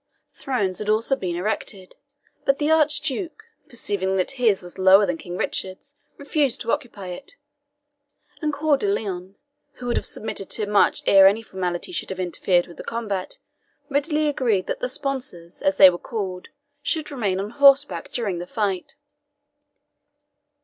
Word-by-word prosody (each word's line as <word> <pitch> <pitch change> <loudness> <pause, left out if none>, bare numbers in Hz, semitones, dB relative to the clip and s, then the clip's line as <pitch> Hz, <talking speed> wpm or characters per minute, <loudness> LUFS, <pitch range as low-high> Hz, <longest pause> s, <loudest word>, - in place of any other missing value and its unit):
Thrones 200 -9 -2
had 210 - -5
been 215 - +4
also 230 +5 0
erected, 185 +1 -3 0.5
but 275 0 +2
the 300 +1 +1
Archduke, 310 +5 +1 0.3
perceiving 200 -6 -2
that 185 - 0
his 230 -8 +1
was 175 +1 -11
lower 190 +2 +7
than 175 -3 -1
King 175 +2 -7
Richard's, 190 +12 -3 0.2
refused 285 -2 0
to 230 - -1
occupy 200 -6 -4
it; 275 - -7 1.1
and 305 -1 0
Coeur 295 0 +2
de 410 - -2
Lion, 195 - -3 0.4
who 250 - -10
would 240 - 0
have - - -1
submitted 200 -2 -4
to 215 - -1
much 205 0 +3
ere 195 -1 +8
any 210 +4 +2
formality 180 - -4
should - - -3
have 190 -1 -5
interfered 180 0 +1
with 170 - -14
the - - -7
combat, 205 -5 -4 0.5
readily 300 +2 +1
agreed 235 -10 +1
that - - -3
the 250 - -2
sponsors, 250 -12 -5
as 190 - +2
they 190 -1 +9
were 175 - -6
called, 190 -5 -5 0.3
should 310 +1 -2
remain 205 -9 -1
on 205 +2 -4
horseback 280 +2 +4
during 200 -8 -2
the 175 - -6
fight. 195 -3 -2
210 Hz, 160 wpm, -23 LUFS, 185-275 Hz, 1.1 s, they